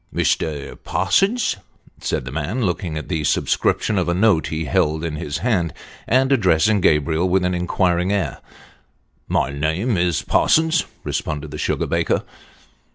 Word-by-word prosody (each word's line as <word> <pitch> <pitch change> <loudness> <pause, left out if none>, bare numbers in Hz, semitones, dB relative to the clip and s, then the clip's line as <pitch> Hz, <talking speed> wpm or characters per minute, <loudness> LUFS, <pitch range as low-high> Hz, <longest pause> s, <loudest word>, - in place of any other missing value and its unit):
" - - -20
Mr. 75 -3 -1
Parsons? 195 - +1 0.2
" - - -29
said - - -2
the 65 - -6
man, 80 - -2
looking 90 -3 -2
at 80 - -6
the 80 -4 -2
superscription 100 +6 +1
of 90 -2 -1
a 85 - +1
note 90 -7 +3
he 80 +1 -3
held 75 +3 +1
in 80 -2 -3
his 75 -1 -4
hand, 90 -10 +1 0.4
and 130 +2 +3
addressing 95 - +3
Gabriel 80 +3 +2
with 90 0 +2
an 90 - 0
inquiring 90 +1 +1
air. 100 -3 -1 0.5
" - - -43
My 70 - +1
name 80 - -1
is 85 -3 +1
Parsons," 160 +1 +3 0.2
responded 75 0 -3
the - - -6
sugar - - 0
baker. - - 0
85 Hz, 160 wpm, -21 LUFS, 80-100 Hz, 0.5 s, note